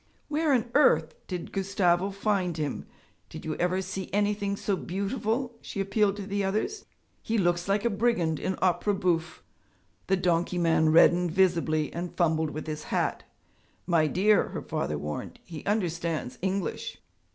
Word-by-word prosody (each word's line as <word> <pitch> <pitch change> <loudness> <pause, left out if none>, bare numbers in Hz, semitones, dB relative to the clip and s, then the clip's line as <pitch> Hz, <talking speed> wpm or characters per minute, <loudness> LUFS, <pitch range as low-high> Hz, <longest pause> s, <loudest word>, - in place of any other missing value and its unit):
'Where 305 0 +1
on 240 -3 +1
earth 160 - +4
did 180 -2 -5
Gustavo 190 -1 +1
find 195 -4 -1
him? 150 -3 -3 0.4
Did - - -9
you 155 - -2
ever 180 +2 0
see 190 0 -5
anything 205 0 0
so 200 - 0
beautiful?' 220 +7 -2
she - - -6
appealed 200 +1 +2
to 205 -1 -6
the 200 0 -1
others. 220 - -2 0.4
'He 225 - -1
looks 175 -2 +1
like 200 +3 +1
a - - +4
brigand 200 -8 +1
in 190 - -2
opera 190 +3 +2
bouffe.' 170 -4 -1 0.6
The 190 - +3
donkey 175 -1 +1
man 165 -2 +3
reddened 175 +2 +5
visibly 165 -4 +2
and 175 +1 -5
fumbled 160 -2 +2
with 155 +1 -6
his 155 -1 -5
hat. - - -1 0.6
'My 165 -3 +3
dear,' 205 +6 +3
her - - -5
father 75 - -2
warned, 75 +1 -5
'he 160 -4 -8
understands 170 - -1
English.' 190 0 -2
185 Hz, 155 wpm, -28 LUFS, 170-205 Hz, 0.6 s, reddened